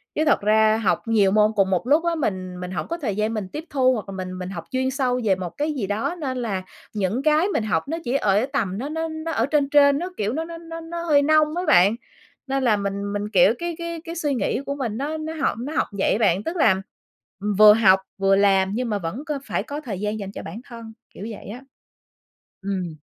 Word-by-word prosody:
Chứ 310 - +1
thật 295 - +3
ra 215 +1 +4
học 220 -4 0
nhiều 210 -4 +3
môn 210 +1 +4
cùng 195 -2 +3
một 190 +5 0
lúc 310 +5 +3
á 340 0 +1
mình 185 - -3
mình 180 0 -6
hổng 180 - -4
có 335 - -3
thời 230 - -3
gian 215 +2 0
mình 210 -4 -3
tiếp 310 +8 -7
thu 260 -2 +3
hoặc 215 -4 -5
là 195 - -6
mình 185 -1 -5
mình 180 0 -5
học 175 -4 -6
chuyên 260 0 0
sâu 255 -2 0
về 195 -3 +3
một 180 -2 -5
cái 300 +1 -1
gì 220 -9 -3
đó, 215 +11 -2
nên 260 -4 -3
là 205 -6 -2 0.3
những 215 +5 -1
cái 310 +4 +3
mình 375 - -1
học 220 +5 -1
nó 325 +3 -2
chỉ 245 - -2
ở 210 -4 +2
tầm 195 -9 -1
nó 265 +6 -4
nó 320 +1 -2
nó 315 +1 -5
ở 230 -7 +1
trên 285 0 +1
trên 285 -1 +5
nó 360 +2 -4
kiểu 210 +2 -1
nó 320 +3 -2
nó 335 0 -8
nó 330 0 -8
nó 335 +1 -6
hơi 300 -4 +4
nông 305 +1 +3
á 355 - -1
bạn. 190 +5 +5 0.5
Nên 270 0 -1
là 220 -4 +3
mình 200 0 -3
mình, 205 0 -3
kiểu, 195 0 +5
cái 345 -1 -3
cái 335 -1 -5
cái 335 0 -7
suy 300 -4 -1
nghĩ 250 +2 -1
của 280 - -3
mình 235 -6 -3
nó 295 +4 -3
nó 315 +1 -5
học 275 - +1
nó 280 +6 -5
học - - +1
vậy - - +2
á - - +1
bạn, 195 -3 +2
tức 330 - -4
là 190 - +4 0.8
vừa 210 0 +10
học 195 -4 +5 0.2
vừa 195 0 +3
làm 195 -1 +3
nhưng 245 0 -2
mà 205 -2 -1
vẫn 195 - -5
có 300 -3 -3
phải - - -2
có 290 +1 -6
thời 215 -10 -5
gian 210 +1 -2
dành 195 -1 -6
cho - - -8
bản 200 +9 -8
thân, 230 -2 -10 0.2
kiểu 205 - -8
vậy 215 - -9
á. 245 +5 -8 1.0
Ừm. 185 -4 -3
230 Hz, 255 wpm, -23 LUFS, 200-300 Hz, 1.0 s, vừa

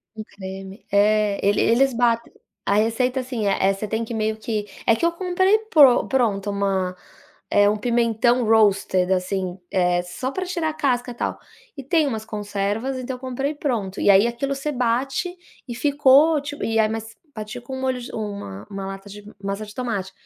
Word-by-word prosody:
Um 215 - -6
creme. 195 0 -9
É, 205 0 +3
ele 200 0 +3
eles 260 +3 +3
bat 235 -1 +2 0.4
a - - +2
receita, 230 +5 +1
assim, 245 -5 -3
é: 195 0 +2
você 195 +2 -5
tem 220 +2 -2
que 230 - -6
meio 220 0 -1
que 215 -1 -3 0.2
é 230 - +5
que 230 - -1
eu 340 - +3
comprei 375 +3 +2
pron 275 -6 +6
pronto 210 -7 0
uma, 195 -2 -1 0.6
eh, 205 0 +5
1 210 - 0
pimentão 235 +1 +2
roasted, 200 -4 +3
assim, 185 0 -2
eh, 180 -2 +2
só 215 +9 -4
pra 375 +5 -3
tirar 345 -3 -1
a - - -4
casca, 250 -5 -1
tal. 240 - -3 0.4
E 275 - -6
tem 310 +3 +2
umas 220 -5 -3
conservas, 210 +4 -3
então 255 0 -4
eu - - -19
comprei 270 +3 -2
pronto. 230 -10 -2
E - - +3
aí 200 +3 +6
aquilo 275 +4 -2
você 275 +2 -3
bate 265 +7 -1 0.3
e 240 - -5
ficou, 290 +3 +4
tipo, 290 0 -6
e 225 0 +1
aí 215 -1 +3
mas 225 0 -5 0.2
bati 215 +3 -6
com 265 +2 -7
um - - -6
molho 260 -1 -1
de 240 - -8
1- 200 - -6
1 195 -1 -5
lata 195 +1 -8
de 205 +1 -10 0.2
massa 200 +2 -3
de 210 - -13
tomate. 225 -7 -3
225 Hz, 195 wpm, -22 LUFS, 200-260 Hz, 0.6 s, pron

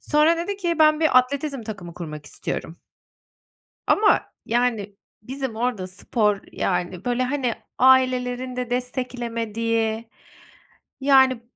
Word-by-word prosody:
Sonra 305 +3 +3
dedi 370 +4 -3
ki 345 -4 -1
"Ben 310 0 +5
bir 310 -6 +6
atletizm 275 0 -2
takımı 195 -6 -8
kurmak 150 -4 -7
istiyorum." 165 - -5 1.1
Ama, 420 0 +4 0.3
yani, 225 -4 0 0.3
bizim 260 -1 -5
orada 230 -5 -1
spor, 205 +2 0
yani, 180 0 -2
böyle 245 0 0
hani 255 -2 -1 0.2
ailelerin 255 -1 +3
de 250 -1 -3
desteklemediği, 230 -3 -2 0.9
yani, 265 -3 +4
250 Hz, 110 wpm, -23 LUFS, 220-265 Hz, 1.1 s, bir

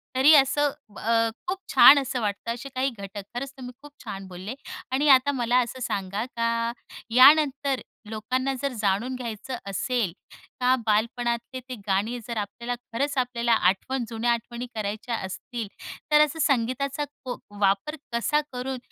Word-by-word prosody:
तरी 270 +4 +7
असं 285 +1 +4 0.3
अ, 230 0 +2 0.2
खूप 370 +2 -1 0.2
छान 285 - +9
असं 255 -2 -3
वाटतं 210 +2 -2
असे 260 +3 -8
काही 260 +2 +1
घटक. 200 -3 -8
खरंच 265 +3 -4
तुम्ही 250 -1 -8
खूप 290 - -13
छान 195 -4 -6
बोलले 185 +5 -7 0.4
आणि 285 +3 +2
आता 270 +1 +6
मला 245 -2 +1
असं 260 +2 -8
सांगा, 205 -2 -2
का 230 -1 -1 0.4
यानंतर 275 0 +6 0.3
लोकांना 255 +5 -1
जर 280 -2 -1
जाणून 210 +6 0
घ्यायचं 245 +1 -5
असेल, 210 -2 -1 0.5
का 255 0 +4
बालपणातले 235 +3 0
ते 255 - -4
गाणी, 205 +5 0
जर 235 -2 -4
आपल्याला 235 +4 -3 0.2
खरंच 280 +4 -1
आपल्याला 240 -2 +1
आठवण, 225 +6 +1
जुन्या 235 +1 0
आठवणी 235 +1 -3
करायच्या 215 +2 -3
असतील, 220 +3 -5 0.4
तर 300 0 +7
असं 300 +2 -8
संगीताचा 275 +2 0 0.2
को 250 - -4 0.2
वापर 200 +10 +1 0.2
कसा 265 +6 +2
करून 255 +1 -4
245 Hz, 150 wpm, -26 LUFS, 220-265 Hz, 0.5 s, छान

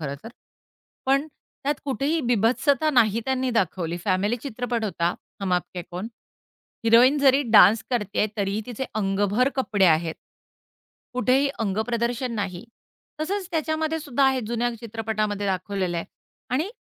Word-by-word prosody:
खरंतर. 140 +6 -6 0.8
पण 275 +2 +2 0.4
त्यात 290 +2 +1
कुठेही 280 +4 0
बिभत्सता 250 +5 +2
नाही 230 -5 +3
त्यांनी 260 -1 0
दाखवली. 180 -6 -1
फॅमिली 200 +4 +1
चित्रपट 245 -3 -3
होता 170 -4 -1 0.3
हम 195 -2 -1
आपके 180 0 -2
कौन? 180 +5 -5 0.8
हिरोईन 240 +5 +6
जरी 275 0 +4
डान्स 215 0 +7
करतेय, 210 -4 0
तरीही 200 0 -1
तिचे 250 +1 -4
अंगभर 205 +4 +1
कपडे 210 -7 +2
आहेत. 160 0 +2 1.0
कुठेही 255 +3 +2
अंगप्रदर्शन 235 +4 -1
नाही. 195 -2 -4 0.6
तसंच 380 +3 -2
त्याच्यामध्येसुद्धा 315 -4 0
आहे, 265 -1 +3
जुन्या 240 +1 0
चित्रपटामध्ये 215 -2 -2
दाखवलेलं 190 -1 -2
आहे 170 - -2 0.5
आणि 305 +10 0
230 Hz, 120 wpm, -24 LUFS, 200-265 Hz, 1.0 s, डान्स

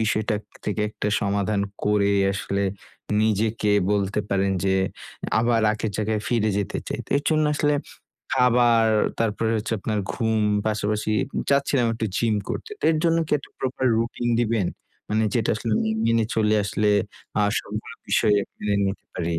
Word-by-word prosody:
বিষয়টা 110 0 +1 0.3
থেকে 105 0 -2
একটা 105 - -3
সমাধান 100 0 0 0.2
করে 105 -1 +3 0.2
আসলে 100 +1 -2 0.6
নিজেকে 110 0 +1 0.2
বলতে 100 0 +1
পারেন 100 0 +1
যে 95 0 +2 0.6
আবার 115 0 +2
আগের 105 0 -3
জায়গায় 110 0 -1
ফিরে 110 -3 +2
যেতে 100 -1 -2
চাই। - - -3
তো - - -22
এর 145 - -1
জন্যে 155 -1 +2
আসলে 150 0 +2 0.6
খাবার, 120 -3 +4 0.3
তারপরে 110 0 0
হচ্ছে 110 +1 -3
আপনার 110 0 -1
ঘুম 110 -2 0 0.3
পাশাপাশি 105 0 -1 0.4
চাচ্ছিলাম 140 -3 +2
একটু 110 0 -2
জিম 115 -2 +2
করতে। 455 - -5
তো - - -5
এর 155 - 0
জন্য 165 0 +3
কি - - -5
একটা - - -14
প্রপার 130 0 -2
রুটিন 120 +1 -2
দিবেন? 115 -5 +1 0.4
মানে 110 +1 +1
যেটা 115 -3 +1
আসলে 110 +1 -2
মে 110 - 0 0.2
মেনে 115 -1 +3
চলে 110 -1 +2
আসলে 105 +1 0 0.5
আ - - +4 0.2
সবগুলো - - -6
বিষয় 105 - +3 0.2
মেনে 105 -1 -1
নিতে 95 +1 -4
পারি। 85 -1 -1
110 Hz, 160 wpm, -24 LUFS, 105-115 Hz, 0.6 s, খাবার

